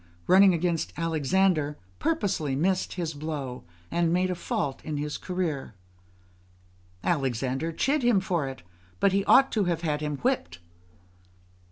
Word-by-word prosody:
] 85 0 -31
running 190 +1 +7
against 170 -1 0
Alexander, 165 -1 +1 0.2
purposely 180 - 0
missed 185 +6 0
his 170 -3 -3
blow, 145 -4 -5 0.3
and 170 -1 +1
made 185 +1 +1
a - - +1
fault 145 -5 -3
in 155 -2 -3
his 150 +1 -3
career; 165 - -3 1.3
Alexander 135 0 -1
chid 275 - +1
him 240 -5 +4
for 175 -6 -1
it, 135 -8 -8 0.4
but 200 - +4
he 195 +1 +1
ought 270 +1 +6
to 210 -3 +1
have 170 -2 -1
had 150 -3 -1
him 150 -1 -2
whipped. 245 - -1
165 Hz, 145 wpm, -27 LUFS, 145-185 Hz, 1.3 s, running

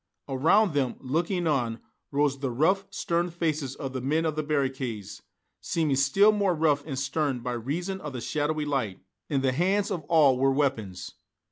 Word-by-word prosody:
Around 160 +8 +3
them, 135 -4 0
looking 170 +7 -1
on, 120 -7 0 0.3
rose 140 -1 +1
the 135 -1 -2
rough, 185 +11 +1
stern 175 -2 -1
faces 155 -5 -2
of 135 -2 -5
the 130 - -3
men 155 +5 +1
of 155 -2 -1
the 155 - 0
barricades, 135 -8 -2 0.4
seeming 155 -5 0
still 165 +11 +5
more 200 -4 +1
rough 150 -3 +2
and 135 -4 -4
stern 135 -1 -1
by 125 +1 -3
reason 170 - -3
of 150 -2 -6
the 125 - -4
shadowy 150 +3 -1
light; 125 -10 -2 0.3
in 140 -3 +1
the 130 -1 +2
hands 195 +9 +1
of 180 -4 -2
all 145 -5 +4
were 135 +1 +3
weapons. 130 -10 -2
145 Hz, 175 wpm, -27 LUFS, 130-165 Hz, 0.4 s, still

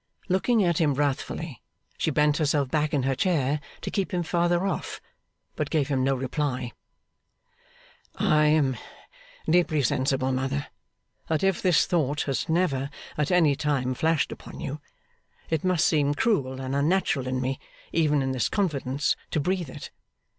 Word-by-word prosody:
Looking 205 +4 +3
at 170 -3 +2
him 150 -4 +2
wrathfully, 145 - -2 0.3
she - - 0
bent 150 0 +2
herself 145 -4 +1
back 155 -1 +1
in 140 -3 +1
her 135 +1 +1
chair 145 -1 +1 0.2
to - - -4
keep 195 -3 -1
him 175 -1 0
further 175 +2 +1
off, 195 - -3 0.6
but - - -2
gave 150 -4 0
him 135 -2 +1
no 135 +1 +2
reply. 130 -1 -2 1.4
'I 150 0 +3
am 150 -5 +3 0.7
deeply 160 -3 +3
sensible, 130 +2 +1
mother, 135 +2 -1 0.6
that 160 +3 0
if 195 -2 +2
this 180 -4 +4
thought 150 -4 0
has 135 +2 -2
never 145 -6 +1 0.3
at 150 -1 0
any 165 -6 +4
time 140 -4 0
flashed 160 +3 +1
upon - - -9
you, 145 +2 -5 0.7
it 160 -2 0
must 180 -3 +2
seem 145 -2 +2
cruel 135 - 0
and 130 +1 -3
unnatural 145 -3 +1
in 130 0 -1
me, 130 +1 -2 0.3
even 150 -4 +2
in 135 - -1
this 130 -2 0
confidence, 145 -8 0
to - - 0
breathe 180 0 -1
it. 145 - -9
150 Hz, 155 wpm, -26 LUFS, 135-165 Hz, 1.4 s, this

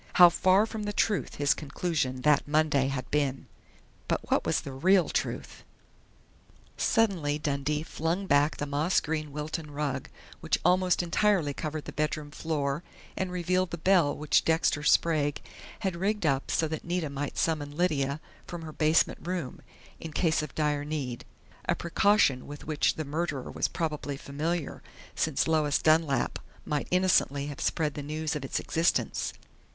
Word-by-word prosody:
How 175 -1 +9
far 185 +4 +4
from 220 -1 -6
the 205 - -2
truth 205 0 0
his 145 0 +3
conclusion 140 -4 -2
that 150 -1 +3
Monday 150 -3 +2
had 130 -2 -4
been! 140 -3 0 0.6
But - - -2
what - - +2
was - - +1
the - - -7
real 180 +7 +3
truth? - - -3 1.1
Suddenly 180 -10 +1
Dundee 150 0 -1
flung 165 +5 -2
back 145 -2 +3
the 145 - -2
moss 150 +5 +1
green 155 -1 -3
Wilton 150 +2 -4
rug 145 -3 -3 0.3
which - - 0
almost 180 0 +3
entirely 175 -3 +2
covered 155 +1 -4
the - - -6
bedroom 150 0 -2
floor 145 -2 -2 0.3
and 185 -1 -2
revealed 180 +1 0
the 170 - -5
bell 170 -4 +3
which 150 0 +2
Dexter 160 -2 +2
Sprague 150 -1 +2 0.4
had 190 -3 -1
rigged 200 +2 -1
up 140 -2 +1
so 160 - +1
that 160 0 -5
Nita 170 -4 -2
might 140 +1 -4
summon 150 -3 -1
Lydia 145 -5 +1 0.3
from 175 -2 -6
her 155 -1 -8
basement 155 +1 +2
room, 175 -7 -4 0.4
in 160 -2 -7
case 165 -2 +2
of 150 -3 -7
dire 150 -2 0
need 135 -5 -4 0.4
a - - +3
precaution 170 -6 +2
with 145 0 -9
which 155 -2 +1
the 155 - -4
murderer 145 -2 -3
was - - 0
probably 150 -3 -3
familiar, 155 +3 -3 0.3
since 155 -4 0
Lois 155 -3 +2
Dunlap 155 -5 +2 0.3
might 150 -1 -2
innocently 180 -6 +2
have 145 - -7
spread 150 -2 0
the 145 - -5
news 155 +2 -3
of 150 - -4
its 135 - -2
existence. 165 +2 0
155 Hz, 160 wpm, -28 LUFS, 145-170 Hz, 1.1 s, How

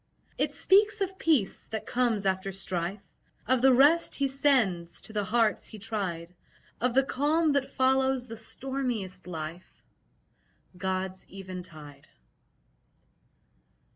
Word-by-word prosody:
It - - 0
speaks 415 +2 +4
of 380 0 -2
peace 285 -12 +1
that 220 - -5
comes 235 -5 0
after 190 0 0
strife, 185 +1 -3 0.4
Of 255 +1 +2
the 265 +1 +6
rest 290 +7 +5
He 280 - +1
sends 230 - +1
to 220 - -10
the 210 -1 0
hearts 220 +1 +1
He 220 - -10
tried, 190 -5 -3 0.5
Of 250 0 0
the 270 - +5
calm 300 +4 +1
that 280 -1 0
follows 265 -1 +2
the 230 -2 -8
stormiest 225 -6 -4
life 165 +1 -8 0.9
God's 185 0 -3
eventide. 175 -7 -9
220 Hz, 120 wpm, -28 LUFS, 185-265 Hz, 0.9 s, the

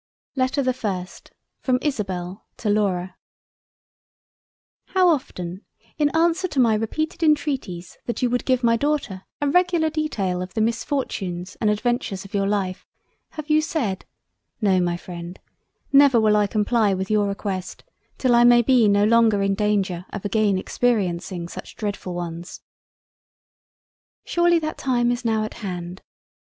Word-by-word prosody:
LETTER 265 +1 +1
the 255 0 +1
FIRST 190 -7 -5 0.3
From 255 -2 +1
ISABEL 195 - -3
to 215 - -2
LAURA 185 -3 0 1.7
How 375 -1 +3
often, 185 - -2 0.4
in 295 -1 +3
answer 340 +3 +2
to 295 -6 -3
my 235 -3 +5
repeated 310 +10 -2
intreaties 280 - 0
that 235 - -2
you 245 - +3
would 245 - 0
give 255 -1 +1
my 230 -1 +4
Daughter 260 -8 -2 0.2
a 290 - +1
regular 345 0 +2
detail 205 - -1
of 180 0 -7
the - - 0
Misfortunes 205 -6 -2
and 215 - +3
Adventures 210 -3 -1
of 195 - -13
your 195 -1 +1
Life, 195 -2 -2 0.5
have 310 -1 -7
you 310 0 +4
said 255 - -2 0.5
"No, 195 -4 +3
my 175 -1 0
freind 175 0 -8 0.6
never 275 -3 +7
will 215 -1 +4
I 210 -1 +3
comply 210 -1 +1
with 190 +2 -3
your 210 -1 +3
request 195 -2 -4 0.3
till 255 -2 +2
I 240 0 +6
may 240 0 +6
be 245 -2 +4
no 205 0 +4
longer 220 -2 +4
in 195 0 +1
Danger 195 -4 0
of 200 - -7
again 205 -1 +2
experiencing 185 -5 -1
such - - -9
dreadful 200 -4 -4
ones." 170 0 -6 1.6
Surely 345 0 +3
that 310 -1 -3
time 245 -2 +1
is 245 +1 -3
now 220 -2 +1
at 215 - -5
hand. 180 -2 -6
215 Hz, 150 wpm, -23 LUFS, 190-260 Hz, 1.7 s, never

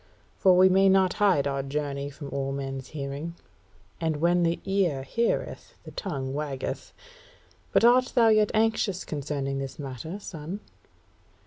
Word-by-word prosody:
For 185 -2 +4
we 185 +1 +7
may 195 +1 +5
not 190 -1 +4
hide 185 -9 +4
our 140 -1 -1
journey 140 0 -3
from 145 0 -9
all 135 0 -2
men's 135 -1 -4
hearing; 145 +3 -5 0.6
and 160 -2 0
when 175 +3 +3
the 170 0 +1
ear 185 -9 +1
heareth, 230 - -2
the - - -10
tongue 135 -9 -4
waggeth. 140 -2 -4 0.8
But - - +3
art 250 +1 +5
thou 230 -3 +6
yet 215 -1 +4
anxious 220 -4 +1
concerning 140 -2 -3
this 135 -1 -5
matter, 140 - -6
son?" 175 +1 -7
155 Hz, 145 wpm, -27 LUFS, 140-190 Hz, 0.8 s, we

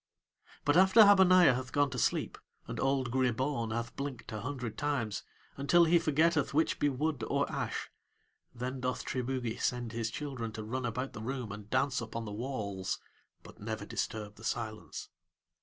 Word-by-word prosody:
But 145 - +3
after 190 +4 +7
Habaniah 185 -6 +7
hath 130 +1 -4
gone 145 -1 +2
to 125 - -3
sleep - - 0 0.3
and - - -5
old 135 -2 +1
Gribaun 130 -1 0
hath 115 +1 -3
blinked 140 -3 -5
a 105 - -4
hundred 125 -3 -4
times, 140 -8 -1 0.4
until 170 +5 +5
he 170 +1 +5
forgetteth 155 -2 +2
which 160 - +2
be 145 - +3
wood 140 -1 -1
or - - +1
ash, - - -3 0.6
then 125 +2 -4
doth 125 0 -2
Triboogie 125 -2 -2
send 120 -2 -1
his 115 -1 -2
children 125 -3 -4
to 110 - -5
run 120 +3 -2
about 125 +4 -3
the 110 - -7
room 125 -1 -4
and 105 0 -8
dance 130 +1 +1
upon 115 0 -5
the 105 - -6
walls, 105 -5 -3 0.5
but - - -14
never - - -4
disturb 105 -1 -4
the 110 - -13
silence. 110 -2 -4
130 Hz, 170 wpm, -32 LUFS, 115-145 Hz, 0.6 s, after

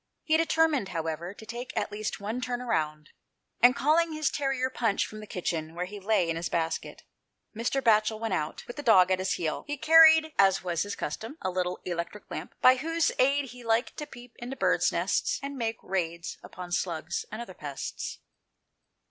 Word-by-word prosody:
He 315 - +2
determined, 320 -8 +2
however, 165 +1 -3
to 220 - -12
take 240 +3 -7
at - - -1
least 215 +1 -4
one 215 +5 -3
turn 245 -1 -2
round, 155 -10 -2 0.5
and 245 +2 +6
calling 315 +5 +2
his 310 -1 0
terrier 270 -2 -1
Punch 225 -5 +1
from 215 - -9
the 215 - -9
kitchen, 165 -3 -3
where 180 +1 -2
he 205 +3 -8
lay 200 -3 +2
in 165 0 -1
his 170 - -3
basket, 165 -1 -2 0.5
Mr. 240 +4 -1
Batchel 215 -1 +3
went 225 -3 -2
out, 155 -3 -3
with 240 - -9
the - - -3
dog 190 -8 +5
at 185 - +2
his 190 0 0
heel. 160 -3 -2
He 290 0 -3
carried, 320 +1 +7
as 195 -1 +6
his 180 +3 -2
custom 225 +5 -5
was, - - -22
a - - -12
little 180 0 -1
electric 175 +3 -5
lamp, - - -6
by 255 +1 +8
whose 330 +4 +1
aid 275 0 +2
he 250 -1 -12
liked 230 +1 +1
to 300 - -5
peep 245 -4 -13
into 245 +3 -5
birds' - - +2
nests, - - 0
and 280 0 -4
make 230 -3 -2
raids 170 -3 -3
upon 180 -1 -9
slugs 170 -1 -2
and - - -5
other 235 -6 -7
pests. 145 -5 -6
220 Hz, 195 wpm, -28 LUFS, 180-265 Hz, 0.5 s, by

